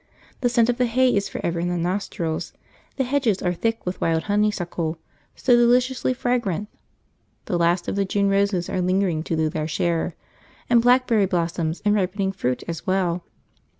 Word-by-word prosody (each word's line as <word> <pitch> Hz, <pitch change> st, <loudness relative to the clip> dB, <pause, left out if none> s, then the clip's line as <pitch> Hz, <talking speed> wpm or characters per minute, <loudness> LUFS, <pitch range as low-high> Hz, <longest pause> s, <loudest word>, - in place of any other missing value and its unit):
The 245 Hz, -, +1 dB
scent 235 Hz, -1 st, +3 dB
of 245 Hz, 0 st, 0 dB
the 250 Hz, -, +3 dB
hay 255 Hz, +2 st, +3 dB
is 200 Hz, 0 st, 0 dB
for -, -, -6 dB
ever 170 Hz, 0 st, -1 dB
in 175 Hz, -, -1 dB
the 175 Hz, -, -1 dB
nostrils, 175 Hz, -2 st, -2 dB, 0.4 s
the 265 Hz, -, 0 dB
hedges 250 Hz, -6 st, 0 dB
are 180 Hz, -, +1 dB
thick 225 Hz, +5 st, -2 dB
with 180 Hz, +1 st, -4 dB
wild 165 Hz, -1 st, +1 dB
honeysuckle, 180 Hz, -6 st, -1 dB, 0.4 s
so 250 Hz, -2 st, +3 dB
deliciously 250 Hz, +2 st, +3 dB
fragrant, 215 Hz, -6 st, -1 dB, 0.8 s
the -, -, -2 dB
last 175 Hz, +1 st, +2 dB
of -, -, -2 dB
the 200 Hz, -, +1 dB
June 200 Hz, +1 st, 0 dB
roses 195 Hz, -3 st, +1 dB
are 185 Hz, -, -1 dB
lingering 185 Hz, -3 st, +1 dB
to 165 Hz, -, -2 dB
do 160 Hz, 0 st, +1 dB
their 155 Hz, 0 st, -3 dB
share, 165 Hz, +1 st, -1 dB, 0.6 s
and 235 Hz, -1 st, +6 dB
blackberry 240 Hz, -4 st, +3 dB
blossoms 170 Hz, -2 st, -2 dB
and 205 Hz, -, +4 dB
ripening 195 Hz, -1 st, 0 dB
fruit 130 Hz, -10 st, -2 dB
as 165 Hz, +1 st, -6 dB
well. 180 Hz, -2 st, 0 dB
195 Hz, 180 wpm, -23 LUFS, 170-230 Hz, 0.8 s, and